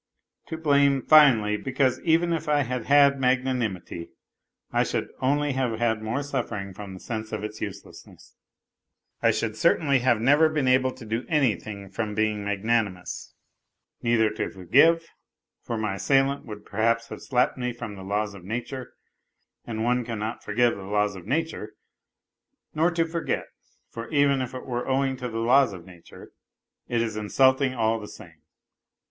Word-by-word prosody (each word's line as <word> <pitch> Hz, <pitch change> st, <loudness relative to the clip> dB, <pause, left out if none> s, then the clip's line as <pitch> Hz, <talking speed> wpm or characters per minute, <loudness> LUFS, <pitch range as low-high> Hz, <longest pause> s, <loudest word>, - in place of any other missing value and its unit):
To 160 Hz, -, -5 dB
blame, 140 Hz, -3 st, +3 dB
finally, 120 Hz, -9 st, +6 dB
because 130 Hz, +2 st, 0 dB
even 170 Hz, +1 st, +2 dB
if 160 Hz, -2 st, -3 dB
I 145 Hz, -1 st, +3 dB
had 125 Hz, -1 st, -4 dB
had 140 Hz, -1 st, +5 dB
mag 130 Hz, 0 st, +2 dB
nanimity, 105 Hz, -10 st, -3 dB, 0.6 s
I -, -, +2 dB
should -, -, -2 dB
only 145 Hz, +2 st, +1 dB
have 130 Hz, -4 st, -1 dB
had 110 Hz, -1 st, 0 dB
more 115 Hz, +6 st, -2 dB
suffering 105 Hz, -8 st, -4 dB
from 95 Hz, 0 st, -9 dB
the -, -, -10 dB
sense 110 Hz, 0 st, -5 dB
of 105 Hz, -1 st, -4 dB
its 105 Hz, 0 st, -6 dB
uselessness. 100 Hz, -1 st, -9 dB, 0.9 s
I -, -, +4 dB
should 110 Hz, -1 st, -1 dB
certainly 140 Hz, 0 st, +3 dB
have 120 Hz, -2 st, +2 dB
never 145 Hz, +7 st, +4 dB
been 150 Hz, -4 st, -1 dB
able 130 Hz, 0 st, +4 dB
to 130 Hz, -2 st, -12 dB
do 115 Hz, +3 st, -2 dB
anything 110 Hz, -, 0 dB
from 105 Hz, 0 st, -3 dB
being 110 Hz, -1 st, 0 dB
magnanimous 100 Hz, -2 st, -2 dB, 0.7 s
neither 115 Hz, -2 st, +2 dB
to 110 Hz, -, -3 dB
forgive, 145 Hz, -, +3 dB, 0.6 s
for 115 Hz, -, -4 dB
my 105 Hz, -3 st, -2 dB
assailant 135 Hz, +8 st, +1 dB
would 105 Hz, -1 st, -9 dB
perhaps 115 Hz, +2 st, 0 dB
have -, -, -8 dB
slapped 125 Hz, -2 st, +1 dB
me 125 Hz, 0 st, -1 dB
from 115 Hz, -3 st, -7 dB
the 95 Hz, -, -10 dB
laws 100 Hz, +2 st, -2 dB
of 100 Hz, -3 st, -12 dB
nature, 120 Hz, +5 st, -5 dB, 0.7 s
and 110 Hz, -1 st, -3 dB
one 125 Hz, +1 st, +1 dB
cannot 115 Hz, -1 st, -5 dB
forgive 120 Hz, +3 st, +2 dB
the 100 Hz, -, -9 dB
laws 105 Hz, +1 st, 0 dB
of 90 Hz, -2 st, -11 dB
nature; 155 Hz, -8 st, -2 dB, 1.0 s
nor 160 Hz, +3 st, +2 dB
to 170 Hz, -1 st, 0 dB
forget, 165 Hz, 0 st, -2 dB, 0.5 s
for 115 Hz, 0 st, -7 dB
even 140 Hz, -3 st, +3 dB
if 130 Hz, 0 st, -5 dB
it 130 Hz, -, -7 dB
were 125 Hz, -2 st, -3 dB
owing 135 Hz, 0 st, +1 dB
to 125 Hz, -1 st, -5 dB
the 115 Hz, -, -5 dB
laws 125 Hz, +1 st, +4 dB
of 90 Hz, -3 st, -10 dB
nature, 90 Hz, -3 st, -14 dB, 0.6 s
it 120 Hz, -1 st, 0 dB
is 110 Hz, -2 st, -4 dB
insult 130 Hz, +5 st, +3 dB
ing 130 Hz, -2 st, 0 dB
all 115 Hz, -1 st, +1 dB
the 105 Hz, -, -8 dB
same. -, -, -14 dB
120 Hz, 170 wpm, -25 LUFS, 105-135 Hz, 1.0 s, finally